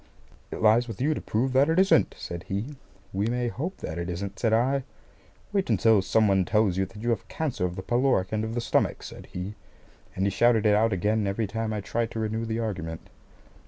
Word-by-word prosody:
"It - - -6
lies 115 +3 +5
with 115 -4 -7
you 150 +4 +2
to - - -5
prove 125 +4 -1
that 135 +3 +4
it 165 - +1
isn't," 190 - +4
said 85 0 -7
he. 110 +10 -3 0.4
"We 100 +3 0
may 120 0 0
hope 165 +11 -4
that 80 - -4
it 85 +1 -3
isn't," 95 +3 -5
said 115 - +1
I. 130 +4 +2 0.7
"Wait 195 -2 0
until 110 -3 +4
some 110 +3 +3
one 95 -1 +3
tells 105 -1 +2
you 95 0 0
that 105 +3 -11
you 120 - +1
have 115 - -2
cancer 150 - -2
of 90 - -7
the 95 - -6
pyloric 120 -6 +1
end 110 0 0
of 110 +1 -4
the 120 - 0
stomach," - - 0
said - - -10
he; 90 +3 -6 0.6
and 95 - 0
he 100 - +1
shouted 115 +1 +3
it 105 - +5
out 110 +2 +3
again 105 +3 +1
every 100 +3 -1
time 110 +2 -3
I 105 -1 -2
tried 115 +3 -2
to 115 - -3
renew 110 +1 -2
the 110 0 -2
argument. 90 -8 -5
110 Hz, 230 wpm, -26 LUFS, 100-120 Hz, 0.7 s, lies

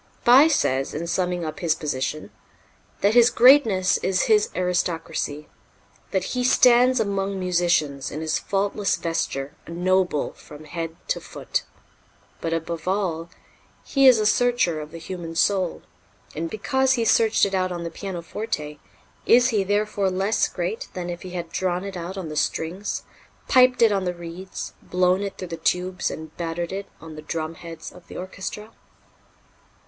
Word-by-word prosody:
Bie 265 +5 +8
says, 135 - 0
in 165 +3 -3
summing 180 0 -1
up 155 -1 -5
his 165 -3 +1
position, 145 0 -3 0.7
that 200 +2 +3
his 240 0 +7
greatness 235 -8 +5
is 190 0 +1
his 210 -1 +3
aristocracy; 165 -4 -2 0.6
that 190 -2 0
"he 250 -1 0
stands 250 0 +5
among 200 -2 -1
musicians, 175 -6 +1
in 150 - -6
his 160 0 -1
faultless 200 0 0
vesture, 145 -4 -3
a - - -10
noble 180 -2 +1
from 150 +1 -13
head 165 +1 -5
to - - 0
foot." - - -3 0.8
But, 165 - -2
above 165 0 -3
all, 175 -4 -1 0.5
he 275 -1 +4
is 255 -3 +8
a 215 - 0
searcher 215 -8 +2
of 150 - -8
the 165 - -9
human 165 -1 -7
soul, 185 0 +1 0.5
and, 165 +2 -3
because 265 - +1
he 235 -3 0
searched 225 -1 +4
it 195 - -4
out 185 -1 0
on 175 -1 -4
the 170 - -5
pianoforte, 170 -4 -5 0.5
is 245 +2 +6
he 210 -5 +1
therefore 205 0 0
less 195 +4 +1
great 480 +2 -4
than 175 -1 -4
if 175 - -7
he 185 - -8
had 175 -2 -6
drawn 180 -1 -1
it 200 -1 -6
out 180 +2 -6
on 185 -4 -4
the 155 - -6
strings, 175 +6 -2 0.4
piped 255 -2 +5
it 225 - +6
on 195 -2 0
the 180 0 -2
reeds, 175 +2 -7
blown 180 +1 +1
it 200 -1 -4
through 185 - -7
the 165 - -5
tubes 180 +2 0
and 160 0 -8
battered 170 0 -3
it 195 +1 -5
on 160 -1 -10
the 155 - -8
drumheads 165 +1 -6
of 175 - -16
the - - -9
orchestra? 200 +3 -6
185 Hz, 165 wpm, -24 LUFS, 165-205 Hz, 0.8 s, Bie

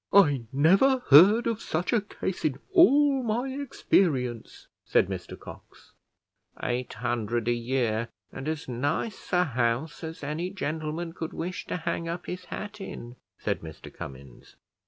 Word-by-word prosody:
"I 145 -11 +5
never 195 - +4
heard 200 - +8
of 230 -1 -1
such 175 +8 -1
a 230 - +4
case 195 -2 -5
in 145 -4 0 0.2
all 290 -6 +6
my 240 +3 -1
experience," 155 - 0 0.2
said - - +3
Mr - - -6
Cox. - - -13 0.7
"Eight 125 +1 -2
hundred 120 -1 -2
a 120 - +3
year, 120 -2 0 0.2
and 135 +2 -7
as 155 -1 -3
nice 140 - -2
a 180 0 +4
house 125 +2 -1
as 160 -1 -7
any 155 +5 -2
gentleman 160 -2 -3
could 165 -2 -5
wish 185 +4 -5
to - - -2
hang 165 0 -3
up 170 +1 -4
his 180 0 -6
hat 210 -1 -7
in," 120 -9 -8 0.2
said - - -2
Mr 80 -2 -10
Cummins. 65 -2 -11
160 Hz, 150 wpm, -27 LUFS, 125-195 Hz, 0.7 s, heard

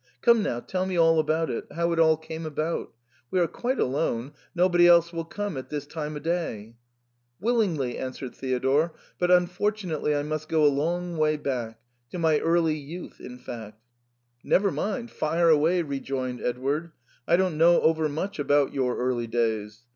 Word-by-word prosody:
Come 235 -2 +5
now, 120 -11 -1
tell 185 +8 -3
me 185 -2 -2
all 165 -1 +5
about 160 +1 0
it, 115 - -4
how 170 +2 0
it 165 - 0
all 160 -1 +5
came 160 +1 -7
about; 155 +1 -3 0.4
we 185 - +1
are 175 - +4
quite 245 - -3
alone, 130 -1 -1 0.2
nobody 175 -1 +5
else 170 0 +5
will 165 -1 -3
come 205 -1 -4
at 130 - -7
this 145 -1 -4
time 150 0 -5
o* - - -4
day." 145 -11 -3 0.7
Willingly," 185 - 0
answered 130 0 -6
Theodore, 135 +5 0
" - - -34
but 180 - +1
unfortunately 180 -3 +1
I 145 - 0
must 155 +1 -4
go 155 -2 +3
a 145 - +5
long 170 +4 -2
way 155 0 +2
back 120 -6 -4 0.2
— 120 0 -46
to - - -5
my 160 -3 +3
early 165 -2 +2
youth 160 +5 -9
in 125 - -9
fact." 110 -4 -9 0.3
" 120 0 -46
Never 200 0 +2
mind; 225 +4 -3
fire 165 +2 +1
away," 165 +3 +3
rejoined 135 -3 -4
Edward; 140 +7 -2 0.2
" 120 - -34
I 170 - +5
don't 180 -4 0
know 170 +1 +6
over 160 -1 +2
much 165 +5 -4
about 145 -1 +2
your 130 -3 0
early 125 -2 -1
days. 110 -2 -2
155 Hz, 185 wpm, -26 LUFS, 130-170 Hz, 0.7 s, know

